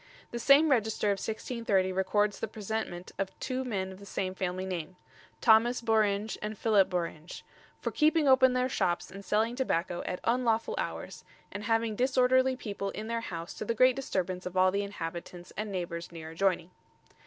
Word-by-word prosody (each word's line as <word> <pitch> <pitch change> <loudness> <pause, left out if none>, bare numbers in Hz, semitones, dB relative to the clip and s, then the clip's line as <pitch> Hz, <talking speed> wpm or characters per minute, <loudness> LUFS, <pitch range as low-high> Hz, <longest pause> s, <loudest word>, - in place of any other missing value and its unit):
The 235 - -4
same 285 +5 +6
Register 220 -4 +2
of 200 -1 +1
1630 220 -4 -1
records 205 +2 +1
the - - -2
presentment 210 -4 -4
of 195 -1 -3
two 260 0 -2
men 195 -6 -3
of 190 - -11
the 200 - -11
same 185 -1 -2
family 185 0 -3
name 180 -2 -4 0.5
Thomas 235 +2 +5
Bouringe 215 -2 +1
and 215 0 -4
Philip 205 -3 +3
Bouringe 170 -2 -4 0.4
"for - - -2
keeping 310 -1 +3
open 260 -1 +6
their 255 0 +1
shops 175 -8 -1
and 195 +1 -9
selling 220 +4 +1
tobacco 175 -9 -1
at 180 - -3
unlawful 230 -2 +1
hours, - - -5 0.3
and 205 +1 -6
having 225 -1 +1
disorderly 260 +1 +3
people 200 -5 -4
in 215 - -6
their 230 0 -1
house 170 -6 -6
to - - -6
the 230 +2 -1
great 255 +2 +5
disturbance 185 -8 -2
of 180 +1 -6
all 185 0 +5
the 200 +1 0
inhabitants 175 -2 -6
and 210 0 -4
neighbours 170 -2 -4
near 160 -1 -8
adjoining." 180 0 0
205 Hz, 175 wpm, -30 LUFS, 185-235 Hz, 0.5 s, same